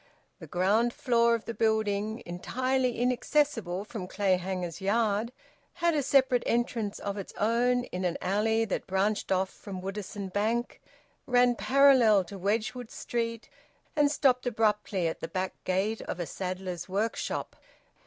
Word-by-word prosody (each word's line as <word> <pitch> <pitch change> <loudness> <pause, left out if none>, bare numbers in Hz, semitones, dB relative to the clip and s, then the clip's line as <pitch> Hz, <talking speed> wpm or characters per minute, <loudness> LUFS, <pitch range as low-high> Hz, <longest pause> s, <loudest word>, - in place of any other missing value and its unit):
The - - -10
ground 210 +7 +2
floor 235 -1 +3
of 230 - -6
the 230 - -4
building, 220 0 0
entirely 255 +8 -1
inaccessible 245 -6 0
from 210 -4 -6
Clayhanger's 185 -2 -1
yard, 215 +2 +1 0.4
had 340 -1 +1
a 300 - +1
separate 260 -2 +3
entrance 230 -3 0
of 200 0 -4
its 195 - -7
own 245 +3 +2
in 185 -6 -5
an 175 -2 0
alley 220 +4 +1
that 200 - -3
branched 195 +3 0
off 190 0 +1
from 195 -3 -8
Woodisun 195 +1 -5
Bank, 225 +4 -1 0.5
ran 245 -1 +4
parallel 255 -6 +5
to 195 +2 -9
Wedgwood 220 +5 -1
Street, 230 -2 -3 0.5
and 295 -2 +4
stopped 255 -4 +2
abruptly 210 -5 +1
at 160 - -3
the - - -4
back 185 +3 -3
gate 195 +4 0
of 180 - -5
a 175 - -2
saddler's 185 -1 -5
workshop. 210 +4 -2
215 Hz, 145 wpm, -29 LUFS, 190-240 Hz, 0.5 s, parallel